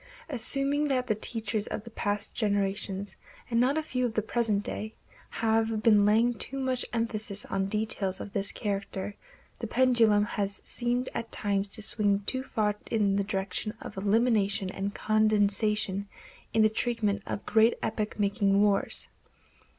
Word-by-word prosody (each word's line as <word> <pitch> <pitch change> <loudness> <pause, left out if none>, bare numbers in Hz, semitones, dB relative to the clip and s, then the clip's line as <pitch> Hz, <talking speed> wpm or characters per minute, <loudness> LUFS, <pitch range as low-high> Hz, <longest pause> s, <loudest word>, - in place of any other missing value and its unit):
Assuming 280 +2 +2
that 255 -3 0
the 215 - +1
teachers 215 -1 -1
of 210 - -5
the 230 - -11
past 205 -1 -1
generation, 200 -2 -1 0.5
and 230 - +2
not 260 +5 +2
a 315 - 0
few 255 -4 -2
of 235 -3 -1
the 215 - +1
present 220 -3 0
day, 215 +1 -5 0.3
have 225 -1 0
been 210 -3 +5
laying 230 +3 +3
too 255 +4 -5
much 260 -1 -1
emphasis 215 -3 -1
on 195 0 -2
details 210 -2 0
of 200 - -8
this 200 0 0
character, 200 -1 -3 0.4
the - - -4
pendulum 230 -5 +3
has 200 -1 -3
seemed 245 +1 -2
at 230 0 -5
times 200 -1 +1
to 215 +1 0
swing 205 -2 +3
too 260 +6 -2
far 215 -5 -1 0.2
in 205 -3 +1
the 200 - +1
direction 195 +2 -3
of - - -9
elimination 205 -1 +1
and 195 +1 -4
condensation 210 -2 +1 0.4
in 220 0 +3
the 215 - +5
treatment 215 -3 -1
of - - -5
great 225 +1 +4
epoch 215 -1 -3
making 200 -1 +2
wars. 205 -1 +4
215 Hz, 160 wpm, -28 LUFS, 200-230 Hz, 0.5 s, been